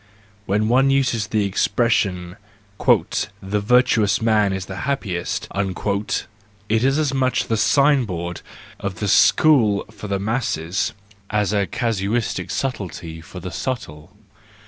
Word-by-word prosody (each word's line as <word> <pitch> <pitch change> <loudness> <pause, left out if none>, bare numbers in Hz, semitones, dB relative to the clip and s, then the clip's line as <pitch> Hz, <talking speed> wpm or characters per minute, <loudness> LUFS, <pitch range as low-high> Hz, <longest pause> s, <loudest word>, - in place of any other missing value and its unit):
(When 105 +2 +1
one 130 +4 +4
uses 125 -6 +1
the 105 -1 0
expression: 100 -3 0 0.2
" 100 -1 -1
The 100 +2 -1
virtuous 110 -2 +3
man 110 -3 +2
is 95 -1 -3
the 95 0 -7
happiest," 95 -11 -2
it 100 +2 -3
is 135 +2 +3
as 150 -3 0
much 130 -1 +1
the 115 - 0
sign 140 +4 +3
board 85 -3 -5 0.4
of 100 -1 -4
the 105 +3 -3
school 110 -2 +4
for 105 - -9
the 100 -1 -1
masses, 95 -5 -1 0.4
as 105 -1 0
a 100 -2 +1
casuistic 115 -1 -1
subtlety 90 -10 -4
for 90 +3 -10
the 90 +1 -7
subtle.) 90 - -5
105 Hz, 130 wpm, -21 LUFS, 95-120 Hz, 0.4 s, one